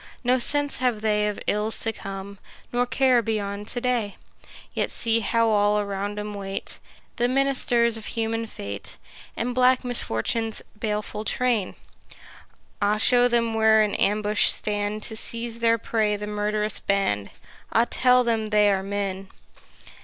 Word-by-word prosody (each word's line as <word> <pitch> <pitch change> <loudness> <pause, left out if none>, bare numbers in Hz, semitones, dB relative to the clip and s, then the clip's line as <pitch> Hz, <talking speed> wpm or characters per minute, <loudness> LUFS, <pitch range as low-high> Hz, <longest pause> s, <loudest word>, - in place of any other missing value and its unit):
No 250 +1 +2
sense 290 +3 +2
have 245 -4 0
they 210 -1 +1
of 210 - -3
ills 210 +1 0
to 225 - +1
come, 195 0 -8 0.3
Nor 245 0 +1
care 250 0 +3
beyond 205 -2 -3
to 245 - -3
day: 240 -5 -1 0.6
Yet - - -1
see 230 0 +1
how 230 +1 +1
all 210 0 +3
around 200 0 -3
'em 210 0 -5
wait 195 -1 -5 0.4
The 240 - +2
ministers 250 -3 +2
of 220 - -8
human 225 0 -2
fate, 100 - -5 0.4
And 245 +2 -2
black 255 +1 +3
Misfortune's 225 - -1 0.2
baleful 210 -1 -3
train! 230 -3 0 1.1
Ah, 205 +1 +2
show 245 +2 +5
them 235 -2 +1
where 220 -1 +4
in 210 - -1
ambush 210 +1 +2
stand 210 0 0
To 220 - -5
seize 230 +1 +1
their 230 0 +3
prey 215 -2 0
the 205 0 -5
murth'rous 210 0 -1
band! 150 - 0 0.4
Ah, 230 - +3
tell 250 0 +3
them 225 -2 0
they 210 -1 +3
are 195 -1 0
men! 195 -1 -4
215 Hz, 150 wpm, -24 LUFS, 205-235 Hz, 1.1 s, show